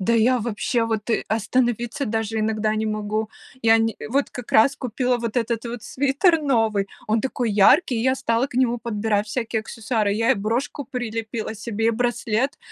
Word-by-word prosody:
Да 225 +5 +1
я, 240 +3 +4
вообще, 230 +1 -1
вот, 220 0 -3
э, - - +1
остановиться 240 +3 0
даже 225 0 -1
иногда 215 0 0
не 220 0 -1
могу. 215 +1 -2 0.3
Я 225 0 +5
не, 225 0 +1
э, - - -6
вот 275 +4 0
как 250 -2 -8
раз 270 +6 +5
купила 250 0 -1
вот 230 0 -4
этот 230 -1 -1
вот 235 -1 -6
свитер 295 +5 +2
новый, 225 -7 +1 0.2
он 220 +1 +1
такой 250 -3 -1
яркий. 240 - +5
И 225 - -1
я 260 +1 +3
стала 235 0 0
к 250 - -15
нему 245 -2 +2
подбирать 210 -2 -1
всякие 225 0 -2
аксессуары. 220 -2 -1
Я 225 +2 +3
и - - 0
брошку 235 +7 -2
прилепила 225 -3 -4
себе, 225 0 -2
и - - +5
браслет, 240 +3 -1
230 Hz, 190 wpm, -23 LUFS, 220-245 Hz, 0.3 s, Я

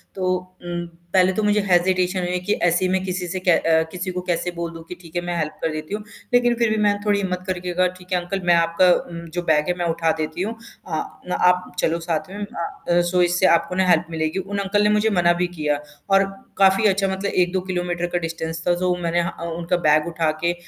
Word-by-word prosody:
तो 185 -1 +1 0.3
उम, 175 0 -4 0.3
पहले 185 0 +5
तो 215 - -1
मुझे 210 0 +3
हेजिटेशन 180 +1 +2
हुई 180 -1 -2
है 180 - 0
कि 205 +4 0
ऐसे 175 +1 +2
ही - - +1
मैं 190 0 +1
किसी 180 -1 -3
से 185 +2 -3
कै 180 -1 +2
अ, 160 0 +3
किसी 185 +1 -4
को 180 0 -4
कैसे 180 0 -1
बोल 170 0 -4
दूँ 165 - -9
कि 180 - -6
ठीक 165 -1 -15
है, 175 - +1
मैं 175 0 -2
हेल्प 155 -2 -2
कर 160 - 0
देती 155 +4 -6
हूँ, 210 0 -3 0.3
लेकिन 245 -1 +4
फिर 235 -1 +2
भी 215 - 0
मैंने 205 -1 +2
थोड़ी 205 -1 +2
हिम्मत 185 -2 -2
करके 180 -1 -3
कहा, 185 +1 +3
ठीक 180 +1 -17
है 180 - +3
अंकल 180 +2 -4
मैं 175 -1 +5
आपका 170 +2 +3
उम, 170 -1 -4 0.2
जो 175 - +1
बैग 150 +1 +2
है 180 - +2
मैं 175 - -1
उठा 165 -1 +1
देती 155 +3 -3
हूँ, 220 +4 -2 0.3
अ, 160 -3 -1 0.3
ना - - 0
आप 180 0 0
चलो 165 0 +1
साथ 165 +1 -2
में 195 - -8
अ, 175 -1 -1
सो, 180 -1 +3
इससे 180 +1 +3
आपको 170 +2 -2
ना 190 0 +2
हेल्प 170 -1 +4
मिलेगी। 160 +2 -1
उन 200 +2 -4
अंकल 200 +1 +1
ने 210 - +4
मुझे 210 +1 +3
मना 175 0 +4
भी 180 - +2
किया 150 -1 0 0.3
और 195 0 +5 0.3
काफ़ी 195 +2 +4
अच्छा 195 0 +2
मतलब 190 +1 -2
1-2 180 +1 +1
किलोमीटर 175 -1 -1
का - - +4
डिस्टेंस 165 -1 -4
था 175 - +4
तो 180 0 +1
मैंने 170 +1 +1
ह 170 - -1
अ, 170 - -9
उनका 170 +1 0
बैग 150 +2 +4
उठा 165 -2 0
के 170 0 +2
180 Hz, 250 wpm, -22 LUFS, 170-190 Hz, 0.3 s, पहले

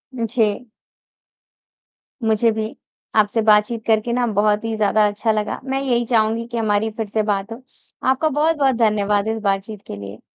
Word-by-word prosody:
जी। 230 -1 -1 1.6
मुझे 220 +1 +3
भी 220 0 -4 0.4
आपसे 215 +1 +3
बातचीत 215 +1 +3
करके 220 +1 +2
ना 245 0 +1
बहुत 210 +1 +2
ही 225 -1 -2
ज़्यादा 210 0 +3
अच्छा 210 +2 -1
लगा। 210 -1 -2
मैं 270 0 -2
यही 240 -3 0
चाहूँगी 225 0 +1
कि 235 -1 -5
हमारी 215 0 +1
फ़िर 220 -1 -4
से 215 +1 -1
बात 205 +1 -2
हो। 235 - -11 0.5
आपका 290 +4 +2
बहुत-बहुत 295 -3 +2
धन्यवाद 210 -2 +1
इस 225 0 -1
बातचीत 200 +1 -2
के - - -6
लिए। 100 +2 -9
220 Hz, 160 wpm, -20 LUFS, 210-235 Hz, 1.6 s, मुझे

